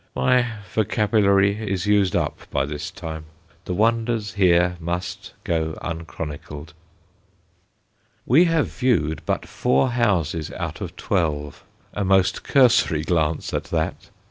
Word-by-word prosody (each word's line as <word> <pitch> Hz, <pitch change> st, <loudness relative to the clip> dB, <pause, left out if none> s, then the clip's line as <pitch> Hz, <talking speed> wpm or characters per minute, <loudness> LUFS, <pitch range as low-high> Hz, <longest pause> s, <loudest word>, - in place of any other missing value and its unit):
My 125 Hz, -2 st, +2 dB, 0.2 s
vocabulary 105 Hz, -1 st, +2 dB
is 95 Hz, -1 st, -1 dB
used 100 Hz, -3 st, +2 dB
up -, -, -2 dB
by 70 Hz, -, 0 dB
this 75 Hz, +1 st, -5 dB
time. 80 Hz, -1 st, -7 dB, 0.4 s
The 90 Hz, -, -3 dB
wonders 115 Hz, 0 st, 0 dB
here 90 Hz, -3 st, +3 dB
must 90 Hz, +2 st, -5 dB
go 80 Hz, -1 st, -1 dB
unchronicled. 75 Hz, -3 st, -7 dB, 1.5 s
We 155 Hz, +9 st, +5 dB
have 165 Hz, -3 st, +2 dB
viewed 85 Hz, -, 0 dB
but -, -, -1 dB
four 70 Hz, -, +1 dB
houses 90 Hz, -10 st, 0 dB
out -, -, -5 dB
of -, -, -6 dB
twelve, 75 Hz, -6 st, -2 dB, 0.3 s
a 105 Hz, -, -2 dB
most 95 Hz, -1 st, +2 dB
cursory 120 Hz, -, +3 dB
glance 80 Hz, -2 st, 0 dB
at -, -, -2 dB
that! -, -, -3 dB
95 Hz, 120 wpm, -23 LUFS, 80-110 Hz, 1.5 s, We